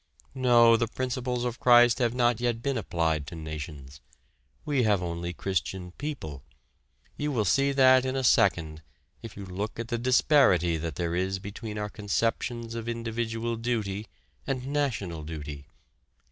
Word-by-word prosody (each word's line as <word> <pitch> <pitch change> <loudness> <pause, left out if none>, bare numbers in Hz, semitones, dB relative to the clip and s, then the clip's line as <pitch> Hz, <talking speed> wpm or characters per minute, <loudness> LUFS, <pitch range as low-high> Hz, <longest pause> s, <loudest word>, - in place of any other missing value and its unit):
No, 120 -3 +5
the 115 - 0
principles 125 0 -2
of 120 0 -3
Christ 120 -1 +6
have 120 -1 +1
not 120 -2 +2
yet 120 -1 -1
been 140 -1 0
applied 80 - -1
to 85 - -7
nations. 75 -4 -8 0.6
We 145 -3 +1
have 105 -5 +2
only 85 0 -3
Christian 90 0 -3
people. 90 - -6 0.8
You 150 0 -1
will 115 -6 0
see 140 +8 +3
that 130 -1 +6
in 130 0 -2
a 135 - -1
second, 80 -9 +2 0.4
if 115 -4 -10
you 100 - -7
look 100 +5 -5
at 115 0 -5
the 120 -2 -1
disparity 125 - +4
that 80 -2 -4
there 85 +1 -2
is 95 +2 -1
between 105 +3 -7
our 105 0 -2
conceptions 115 +3 -2
of 115 0 -4
individual 115 0 -3
duty 110 -3 -2 0.4
and 130 -2 -2
national 125 - -2
duty. 75 -2 -7
115 Hz, 155 wpm, -27 LUFS, 85-125 Hz, 0.8 s, Christ